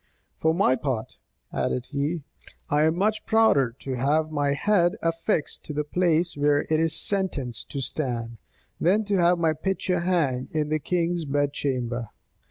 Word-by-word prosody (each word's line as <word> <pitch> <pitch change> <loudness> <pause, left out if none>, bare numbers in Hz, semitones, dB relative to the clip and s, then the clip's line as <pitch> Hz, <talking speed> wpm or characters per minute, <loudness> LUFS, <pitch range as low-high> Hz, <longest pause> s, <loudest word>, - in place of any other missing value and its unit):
"For 160 - +3
my 170 -8 +3
part," 130 -6 -3 0.4
added 125 0 -2
he, 150 +3 -2 0.5
"I 150 +1 +4
am 160 +1 +2
much 215 +3 +1
prouder 145 - +3
to 135 - -4
have 150 +5 +1
my 145 -2 +1
head 175 +2 +2
affixed 165 -2 -1
to 150 - -6
the 150 +1 -1
place 170 +2 +1
where 145 0 +2
it 155 - +3
is 160 0 +2
sentenced 160 - 0
to 140 - -4
stand, 120 -5 -3 0.4
than 200 +6 +3
to 200 -1 +1
have 175 0 +4
my 165 -2 +2
picture 180 +2 -1
hang 160 -8 0
in 150 -1 -1
the 155 0 +1
king's 170 +2 -1
bed 145 0 0
chamber. 125 -5 -2
155 Hz, 165 wpm, -25 LUFS, 140-175 Hz, 0.5 s, I